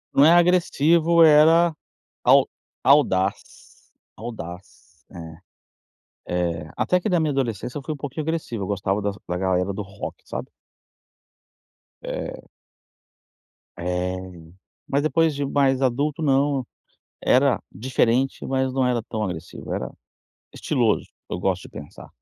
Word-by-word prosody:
Não 140 - +6
é 160 - +7
agressivo 170 -1 +4
era 160 +2 +6 0.5
au - - +5 0.3
audaz, 100 -9 +1 0.3
audaz, 105 -3 -10 1.2
é. 85 -2 -1
Eh, 80 - -13
até 180 - +2
que 215 - -1
na 180 -3 +2
minha 155 -2 +1
adolescência 125 -2 -2
eu 140 - -7
fui 155 - -3
um - - -12
pouquinho 145 +2 -5
agressivo, 150 -9 -3
eu - - -4
gostava 100 0 -1
da 100 0 -1 0.2
da 90 - -2
galera 95 +1 0
do 105 - -4
rock, 100 0 -7
sabe. - - -6 1.5
É. - - -5 1.3
É. 90 +1 -2 0.7
Mas, 140 - +1
depois 155 +2 +2
de 140 0 -2
mais 135 -1 +2
adulto, 140 +5 0
não, 140 -2 +1 0.6
era 130 -2 +3
diferente, 125 +4 0
mas 130 -1 0
não 130 -1 +1
era 120 -2 0
tão 110 0 -5
agressivo, 90 -3 -6
era - - -4 0.6
estiloso, - - 0 0.2
eu - - -3
gosto 90 0 -1
de - - -11
pensar. 75 - -11
130 Hz, 130 wpm, -23 LUFS, 95-150 Hz, 1.5 s, é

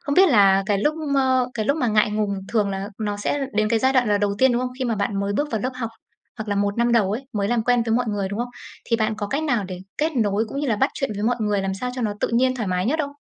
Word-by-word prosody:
không 285 - -2
biết 380 +3 +6
là 195 -6 +5
cái 205 -2 +1
lúc 295 +9 +1
m 305 -3 -2 0.4
cái 220 - -1
lúc 280 - +2
mà 260 -6 0
ngại 210 -1 +3
ngùng 210 -1 -1 0.2
thường 210 -3 +1
là 195 +1 -4
nó 205 -1 -2
sẽ 275 +7 -1
đến 215 0 +1
cái 230 - +2
giai 260 +4 +2
đoạn 250 -4 +3
là 205 -1 +3
đầu 205 -1 0
tiên, 260 +1 +5
đúng 240 - +1
không? 250 0 -2
Khi 260 - -1
mà 235 -2 0
bạn 200 -1 -1
mới 200 0 -1
bước 290 +8 -1
vào 220 - 0
lớp 255 +5 -2
học, 230 -3 -4 0.5
hoặc 220 -1 -5
là 205 - 0
1 200 0 0
năm 235 0 +2
đầu 210 -5 +3
ấy, 255 +5 -4
mới 200 -2 -1
làm 240 -2 +1
quen 245 -1 +3
với 225 - +2
mọi 245 +1 +2
người, 205 -2 -1
đúng 200 +2 -5
không? 245 +1 -2 0.4
Thì 230 - +2
bạn 220 -1 0
có 210 -1 -3
cách 280 +9 -2
nào 245 -9 0
để 185 -1 -6 0.2
kết 315 +2 +1
nối 210 -2 +1
cũng 275 - -4
như 290 - -1
là 220 - +1
bắt 265 +6 +2
chuyện 275 -4 -2
với 205 - -4
mọi 240 +2 +1
người, 210 -2 +1
làm 190 0 -2
sao 250 +6 -4
cho 250 - -3
nó 210 -2 0
tự - - +1
nhiên 255 +2 +2
thoải 220 -5 -2
mái 180 +2 0
nhất 310 +6 +1
không? 280 - -4
220 Hz, 325 wpm, -23 LUFS, 205-255 Hz, 0.5 s, biết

